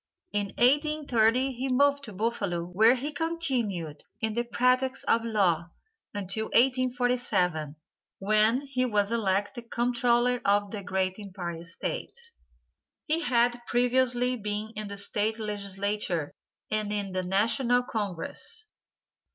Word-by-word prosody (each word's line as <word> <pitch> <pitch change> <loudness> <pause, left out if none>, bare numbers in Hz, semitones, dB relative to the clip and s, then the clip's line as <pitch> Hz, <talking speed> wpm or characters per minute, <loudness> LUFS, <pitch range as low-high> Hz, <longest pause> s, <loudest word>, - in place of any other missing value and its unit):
In 205 -1 0
1830 265 -3 +3
he 260 +1 -4
moved 280 +2 +3
to 215 - -9
Buffalo 200 -4 -2
where 220 +8 +4
he 280 +4 -4
continued 250 - -1 0.2
in 220 -2 -1
the 240 +2 0
practice 255 +2 +1
of 230 - +2
law 185 -7 +1 0.4
until 205 +2 -3
1847, 245 - +1 0.4
when 215 +5 +3
he 270 -3 -1
was 210 -4 +1
elected 220 +2 -1
Comptroller 240 0 +1
of 205 0 +2
the 210 - -4
great 190 -1 -1
Empire 180 -4 -6
State. 170 - -5 0.9
He 315 +1 +3
had 240 -4 +1
previously 250 0 +2
been 210 0 -4
in 215 0 -5
the 200 0 -7
State 210 +2 -1
legislature 200 -5 -2 0.4
and 215 -1 0
in 205 -2 -2
the 185 0 -1
national 230 +7 +2
congress. 210 - -5
220 Hz, 120 wpm, -28 LUFS, 200-250 Hz, 0.9 s, where